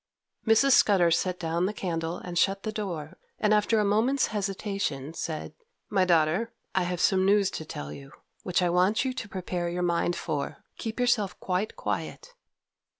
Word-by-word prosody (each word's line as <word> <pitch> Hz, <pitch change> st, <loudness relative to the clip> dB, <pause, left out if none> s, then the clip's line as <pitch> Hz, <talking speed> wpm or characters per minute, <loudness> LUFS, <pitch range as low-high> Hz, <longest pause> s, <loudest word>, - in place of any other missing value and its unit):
Mrs. 225 Hz, +5 st, +5 dB
Scudder 190 Hz, -8 st, +5 dB
set 180 Hz, +2 st, +1 dB
down 170 Hz, +2 st, 0 dB
the 210 Hz, -, -3 dB
candle 165 Hz, -2 st, -2 dB
and 175 Hz, -1 st, -7 dB
shut 195 Hz, +3 st, +2 dB
the 215 Hz, -, -2 dB
door, 175 Hz, -8 st, -5 dB, 0.2 s
and 215 Hz, 0 st, +2 dB
after 215 Hz, +1 st, +3 dB
a 210 Hz, -, +2 dB
moment's 230 Hz, +7 st, +2 dB
hesitation, 195 Hz, -8 st, -2 dB
said, 160 Hz, -1 st, -4 dB, 0.4 s
'My 190 Hz, -3 st, +3 dB
daughter, 175 Hz, +6 st, +2 dB, 0.2 s
I 190 Hz, -2 st, +1 dB
have 180 Hz, -1 st, -2 dB
some 190 Hz, +1 st, +3 dB
news 200 Hz, 0 st, +3 dB
to 160 Hz, -, -5 dB
tell 75 Hz, -, -6 dB
you, 135 Hz, -, -11 dB, 0.3 s
which 180 Hz, -1 st, 0 dB
I 175 Hz, -, +2 dB
want 185 Hz, +8 st, +3 dB
you 260 Hz, -, -1 dB
to 240 Hz, -5 st, -6 dB
prepare 180 Hz, -2 st, -3 dB
your 180 Hz, +1 st, -2 dB
mind 175 Hz, 0 st, +1 dB
for. 150 Hz, -3 st, -4 dB, 0.2 s
Keep 225 Hz, +1 st, -4 dB
yourself 235 Hz, -5 st, +1 dB
quite 190 Hz, +4 st, -2 dB
quiet. -, -, -4 dB
185 Hz, 175 wpm, -27 LUFS, 170-210 Hz, 0.4 s, Mrs